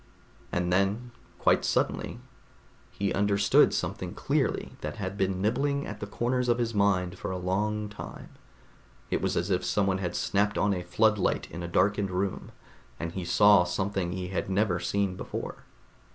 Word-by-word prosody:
And 90 Hz, 0 st, 0 dB
then 100 Hz, +6 st, +1 dB, 0.3 s
quite -, -, +3 dB
suddenly -, -, 0 dB, 0.7 s
he 100 Hz, 0 st, -2 dB
understood 100 Hz, 0 st, +4 dB
something -, -, -3 dB
clearly -, -, 0 dB
that -, -, -4 dB
had 95 Hz, -2 st, -4 dB
been 95 Hz, -1 st, -1 dB
nibbling 140 Hz, +6 st, +1 dB
at 105 Hz, 0 st, -7 dB
the 105 Hz, -, -5 dB
corners 125 Hz, +3 st, 0 dB
of 120 Hz, -, +3 dB
his 115 Hz, -1 st, -1 dB
mind 100 Hz, -3 st, +1 dB
for -, -, -4 dB
a 95 Hz, -, -2 dB
long 105 Hz, +4 st, -1 dB
time. 105 Hz, -, -9 dB, 0.8 s
It -, -, +1 dB
was -, -, 0 dB
as 90 Hz, +4 st, -1 dB
if 90 Hz, -, +1 dB
someone 95 Hz, -2 st, +1 dB
had 90 Hz, -2 st, -3 dB
snapped 105 Hz, +1 st, +1 dB
on 100 Hz, -1 st, +2 dB
a 90 Hz, -, -2 dB
floodlight 105 Hz, +3 st, +1 dB
in 85 Hz, -, -6 dB
a 85 Hz, -, -4 dB
darkened 100 Hz, +3 st, +2 dB
room, 95 Hz, +1 st, -2 dB, 0.5 s
and 85 Hz, 0 st, -3 dB
he 95 Hz, +1 st, -4 dB
saw 100 Hz, +1 st, +6 dB
something 95 Hz, 0 st, -2 dB
he 90 Hz, 0 st, -4 dB
had 95 Hz, -, -2 dB
never 95 Hz, -2 st, +1 dB
seen 95 Hz, +2 st, 0 dB
before. -, -, -6 dB
100 Hz, 165 wpm, -28 LUFS, 90-105 Hz, 0.8 s, saw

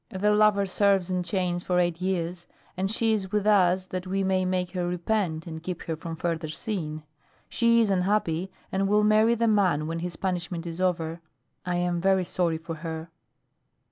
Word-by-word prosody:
The 205 Hz, +2 st, +1 dB
lover 210 Hz, -1 st, +4 dB
serves 195 Hz, -1 st, +2 dB
in 180 Hz, 0 st, 0 dB
chains 175 Hz, -1 st, -1 dB
for 180 Hz, 0 st, 0 dB
eight 175 Hz, -1 st, +1 dB
years, 180 Hz, -2 st, -2 dB, 0.3 s
and 190 Hz, +1 st, -1 dB
she 225 Hz, 0 st, +2 dB
is 195 Hz, -3 st, -2 dB
with 210 Hz, -1 st, 0 dB
us 185 Hz, -3 st, +4 dB
that 185 Hz, 0 st, -5 dB
we 195 Hz, +1 st, 0 dB
may 190 Hz, -1 st, +1 dB
make 180 Hz, -1 st, -1 dB
her 180 Hz, -2 st, -2 dB
repent 175 Hz, -2 st, -1 dB
and 160 Hz, -2 st, -7 dB
keep 175 Hz, 0 st, -5 dB
her 165 Hz, -, -3 dB
from 165 Hz, +1 st, -6 dB
further 165 Hz, -1 st, -2 dB
sin. 155 Hz, -3 st, -4 dB, 0.5 s
She 235 Hz, 0 st, +3 dB
is 215 Hz, -3 st, +2 dB
unhappy 185 Hz, -2 st, +1 dB, 0.2 s
and 195 Hz, +1 st, +1 dB
will 210 Hz, +1 st, +3 dB
marry 215 Hz, +2 st, +4 dB
the 230 Hz, 0 st, +1 dB
man 185 Hz, -8 st, +2 dB
when 165 Hz, +1 st, -3 dB
his 175 Hz, 0 st, -4 dB
punishment 175 Hz, -1 st, -3 dB
is 170 Hz, +1 st, -5 dB
over. 170 Hz, -2 st, -1 dB, 0.5 s
I 180 Hz, -, 0 dB
am 175 Hz, -1 st, 0 dB
very 190 Hz, 0 st, +3 dB
sorry 170 Hz, -2 st, 0 dB
for 165 Hz, 0 st, -7 dB
her." 160 Hz, 0 st, -6 dB
180 Hz, 190 wpm, -26 LUFS, 170-195 Hz, 0.5 s, lover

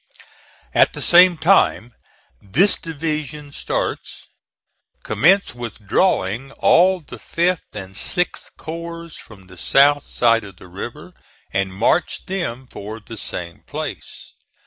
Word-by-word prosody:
At -, -, +4 dB
the -, -, -7 dB
same 175 Hz, 0 st, +6 dB
time 155 Hz, -, +3 dB, 0.5 s
this 175 Hz, -, +4 dB
division 150 Hz, -2 st, -5 dB
starts -, -, -4 dB, 0.8 s
commence 195 Hz, +4 st, +3 dB
withdrawing 120 Hz, -, -1 dB
all 185 Hz, +3 st, +4 dB
of 165 Hz, -, -18 dB
the -, -, -10 dB
5th 175 Hz, -4 st, -2 dB
and 95 Hz, -2 st, -7 dB
6th 180 Hz, -, -2 dB
corps 170 Hz, +1 st, -7 dB
from 100 Hz, -4 st, -14 dB
the 90 Hz, -1 st, -15 dB
south 145 Hz, +9 st, +4 dB
side 115 Hz, -1 st, +2 dB
of 100 Hz, -3 st, -12 dB
the 90 Hz, -, -14 dB
river, 95 Hz, +2 st, -8 dB, 0.4 s
and 95 Hz, -1 st, 0 dB
march 110 Hz, -, 0 dB
them 130 Hz, -10 st, -4 dB
for 110 Hz, -2 st, -8 dB
the 115 Hz, +1 st, -10 dB
same 85 Hz, -5 st, -5 dB
place. -, -, -7 dB
135 Hz, 125 wpm, -20 LUFS, 105-170 Hz, 0.8 s, same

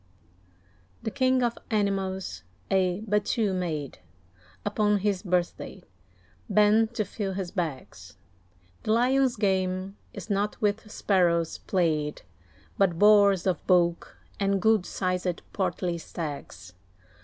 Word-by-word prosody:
The 220 Hz, -, -2 dB
King 260 Hz, -1 st, +2 dB
of 235 Hz, -1 st, -1 dB
Animals 195 Hz, -3 st, -1 dB, 0.3 s
a 185 Hz, 0 st, +2 dB
battue 210 Hz, 0 st, +1 dB
made 160 Hz, -, -3 dB, 0.7 s
Upon 210 Hz, -1 st, +2 dB
his 200 Hz, -1 st, 0 dB
birthday, 180 Hz, -3 st, -2 dB, 0.7 s
bent 215 Hz, +2 st, +4 dB
to 215 Hz, -, 0 dB
fill 195 Hz, 0 st, -4 dB
his 185 Hz, -2 st, -4 dB
bags. 130 Hz, -, -5 dB, 0.6 s
The 215 Hz, -, 0 dB
Lion's 255 Hz, +2 st, +3 dB
game 190 Hz, -1 st, -1 dB
is -, -, -8 dB
not 205 Hz, 0 st, -1 dB
with 210 Hz, +1 st, -1 dB
sparrows 170 Hz, -6 st, +1 dB
played; 155 Hz, -5 st, -1 dB, 0.6 s
But 185 Hz, -4 st, +3 dB
boars 200 Hz, -2 st, +5 dB
of 185 Hz, -5 st, 0 dB
bulk, 175 Hz, -2 st, +2 dB, 0.2 s
and 195 Hz, -1 st, +1 dB
good 220 Hz, -2 st, +3 dB
sized 180 Hz, -1 st, -2 dB
portly 180 Hz, -3 st, -1 dB
stags. 145 Hz, -, -7 dB
195 Hz, 110 wpm, -27 LUFS, 175-210 Hz, 0.7 s, boars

